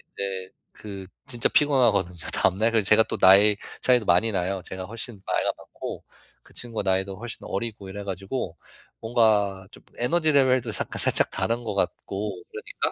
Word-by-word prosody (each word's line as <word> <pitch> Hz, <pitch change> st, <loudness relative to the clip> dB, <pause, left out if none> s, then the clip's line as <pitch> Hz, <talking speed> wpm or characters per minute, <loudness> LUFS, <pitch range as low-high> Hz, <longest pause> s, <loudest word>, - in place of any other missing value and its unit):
근데 95 Hz, -1 st, -3 dB, 0.2 s
그 100 Hz, -3 st, -9 dB, 0.2 s
진짜 120 Hz, -4 st, +1 dB
피곤하거든요 120 Hz, -11 st, +3 dB, 0.2 s
다음날. 110 Hz, +5 st, +2 dB
그래서 110 Hz, -3 st, +2 dB
제가 110 Hz, +1 st, +6 dB
또 110 Hz, -, -4 dB
나이 100 Hz, +2 st, +6 dB, 0.2 s
차이도 125 Hz, -3 st, +3 dB
많이 90 Hz, +6 st, +3 dB
나요. 95 Hz, 0 st, -1 dB
제가 95 Hz, +1 st, -6 dB
훨씬 115 Hz, 0 st, -6 dB
나이가 -, -, +1 dB
많고. -, -, -8 dB, 0.4 s
그 -, -, -20 dB
친구가 115 Hz, -5 st, -3 dB
나이도 95 Hz, 0 st, 0 dB
훨씬 120 Hz, +2 st, -7 dB
어리고 105 Hz, -2 st, -4 dB
이래 100 Hz, +1 st, -7 dB
가지고 95 Hz, -1 st, -4 dB, 0.4 s
뭔가 105 Hz, -4 st, +2 dB
좀 -, -, -15 dB
에너지 155 Hz, +6 st, +2 dB
레벨도 130 Hz, -3 st, +3 dB
사 -, -, -3 dB
살짝 -, -, +2 dB
다른 115 Hz, +1 st, -1 dB
것 105 Hz, -, -3 dB
같고 100 Hz, -1 st, -3 dB
그러니까 -, -, -3 dB
105 Hz, 355 characters per minute, -25 LUFS, 95-115 Hz, 0.4 s, 제가